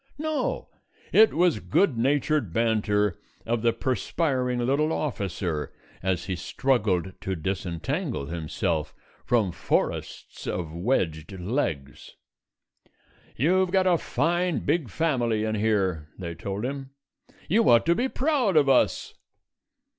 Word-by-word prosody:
No, 310 0 -2 0.4
it 220 +1 +7
was 170 -7 +2
good 120 - +2
natured 135 - +1
banter 105 -3 +1 0.3
of 115 0 0
the 115 0 +3
perspiring 130 - -1
little 140 +6 +1
officer 95 - -2 0.3
as 95 -2 -1
he 95 - -2
struggled 95 -2 0
to 95 - -2
disentangle 95 - -3
himself 80 +1 -2 0.3
from 110 -6 +2
forests - - -2
of 85 -3 -3
wedged 85 -4 -1
legs. 85 - -3 1.2
"You've 185 +8 +2
got 190 0 +2
a 175 -3 +3
fine, 175 +1 0
big 160 -8 +1
family 120 -9 0
in 110 0 -1
here," 100 -7 0
they 85 -3 -5
told 100 +6 -4
him: 135 0 -5 0.6
"you 220 +6 +3
ought 115 -1 +6
to 170 - +4
be 250 +9 0
proud 260 - +1
of 145 -2 +5
us." 135 -2 +2
115 Hz, 120 wpm, -26 LUFS, 90-155 Hz, 1.2 s, it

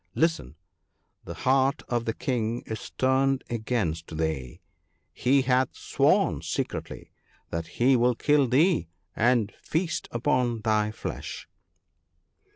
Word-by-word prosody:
Listen! 160 - 0 0.3
— - - -42
the - - -7
heart 135 +2 +2
of 120 -1 -1
the 115 - -1
King 120 -2 -2
is 110 -1 -6
turned 130 +1 +1
against 95 -9 -2
thee! 80 -6 -3 0.5
he 135 +2 +2
hath 130 0 +1
sworn - - +2
secretly - - -4 0.4
that 85 0 -3
he 130 +2 +5
will 125 0 +3
kill 145 +1 +3
thee 150 - +3 0.3
and 115 -2 +2
feast 160 0 -2
upon 120 -2 0
thy 105 -1 +1
flesh.' 110 - -6
120 Hz, 120 wpm, -27 LUFS, 110-135 Hz, 0.5 s, he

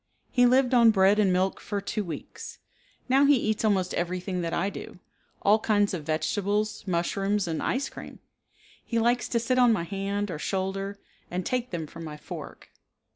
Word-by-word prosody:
He 245 -1 +5
lived 255 +1 +3
on 235 -2 +7
bread 200 0 +4
and 200 -3 +4
milk 185 +1 +1
for 205 -1 -3
two 205 +2 -3
weeks. 165 -5 -8 0.5
Now 270 +2 +4
he 285 0 +6
eats 220 -3 -1
almost 195 -4 +1
everything 180 +1 -2
that 165 -1 -2
I 195 +4 0
do. - - -9 0.5
All 210 +2 +5
kinds 205 -2 +2
of 160 -5 -4
vegetables, 205 +8 -1
mushrooms, 195 +3 0
and 160 -1 -2
ice 270 +2 -1
cream. - - -10 0.7
He 235 - -2
likes 240 +2 +2
to 235 - 0
sit 255 +2 +1
on 245 -1 +6
my 205 -6 +1
hand 200 +2 -3
or 150 - -5
shoulder 195 +2 -2 0.3
and 180 +1 -3
take 250 -1 -1
them 170 -3 -4
from 165 +2 -10
my 150 -2 -7
fork. - - -9
200 Hz, 180 wpm, -27 LUFS, 180-225 Hz, 0.7 s, on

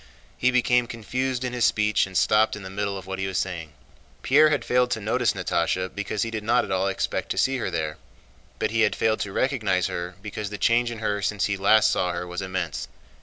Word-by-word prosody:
He 125 - +2
became 125 -1 +2
confused 125 +2 -3
in 125 -1 -3
his 125 -1 -1
speech 105 -2 +2
and 95 -2 -3
stopped 110 0 +3
in 105 - -9
the 95 - -8
middle 100 0 -2
of 95 - -9
what 95 0 -5
he 95 - -1
was 95 - -2
saying. 85 -4 -3 0.5
Pierre 150 +3 +5
had 145 -2 0
failed 125 0 +2
to 115 - -1
notice 115 +4 +1
Natásha 90 0 -1
because 105 0 -2
he 115 - -4
did 110 -2 -4
not 120 +3 +2
at - - -7
all 95 +1 +1
expect 95 - -2
to - - -2
see 135 0 +2
her 120 - -2
there, 80 -3 -3 0.6
but - - -1
he - - +1
had - - +3
failed 110 -1 +1
to 100 - -3
recognize 105 -8 +1
her 90 +1 -4
because 105 -1 -5
the 105 - -6
change 120 +5 +2
in 120 - -6
her 105 -1 0
since 105 0 0
he 105 - 0
last 105 +2 +4
saw 90 -1 0
her 85 +1 -4
was 90 +1 -5
immense. 95 -5 -3
105 Hz, 235 wpm, -25 LUFS, 95-120 Hz, 0.6 s, Pierre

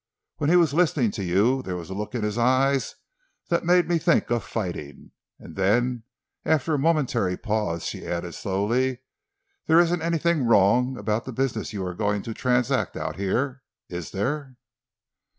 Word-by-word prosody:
When 145 -1 0
he 175 - +5
was 170 -5 +4
listening 150 - +2
to 100 - -5
you 105 +9 +2
there 90 -7 -5
was 85 0 -7
a - - -3
look 105 +5 -5
in 115 - -2
his 105 0 -1
eyes 130 +3 +2 0.5
that 170 - +1
made 175 0 +4
me 170 -1 +1
think 145 - +2
of 120 -1 +1
fighting." 85 - -6 0.3
And - - -12
then, 115 +5 +1 0.4
after 160 0 +1
a 145 - +1
momentary 130 - +1
pause, 105 -7 -2
she - - -5
added 85 0 -3
slowly, 120 +6 -1 0.7
"there 160 - +6
isn't 175 0 +2
anything 165 -4 +1
wrong 120 +5 +4
about 105 +2 -2
the 130 - -5
business 130 +1 -2
you 100 -3 -4
are 90 - -4
going 105 +1 -1
to 115 - -5
transact 125 0 0
out - - -4
here—is 100 - -4
there?" 130 +5 -3
120 Hz, 170 wpm, -25 LUFS, 100-140 Hz, 0.7 s, there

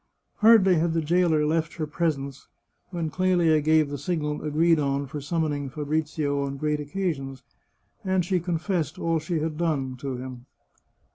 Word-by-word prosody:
Hardly 210 -5 +6
had 165 +1 +1
the 165 - +1
jailer 165 -1 +2
left 160 +1 0
her 160 - -2
presence, 145 -3 -3 0.4
when 170 -4 -3
Clelia 175 -4 +3
gave 155 0 +3
the 145 - -4
signal 150 -5 -2
agreed 160 +2 +2
on 140 -1 0
for 145 +2 -6
summoning 145 -2 -2
Fabrizio 150 0 -1
on 140 0 -4
great 150 +1 -1
oc 145 - -6
casions, 145 -7 -3 0.6
and 190 -2 +1
she 185 +1 +1
confessed 170 -2 -2
all 165 -1 0
she 155 +1 -2
had 155 0 -3
done 140 -6 -1
to 135 -1 -4
him. 125 0 -8
155 Hz, 160 wpm, -26 LUFS, 145-170 Hz, 0.6 s, Hardly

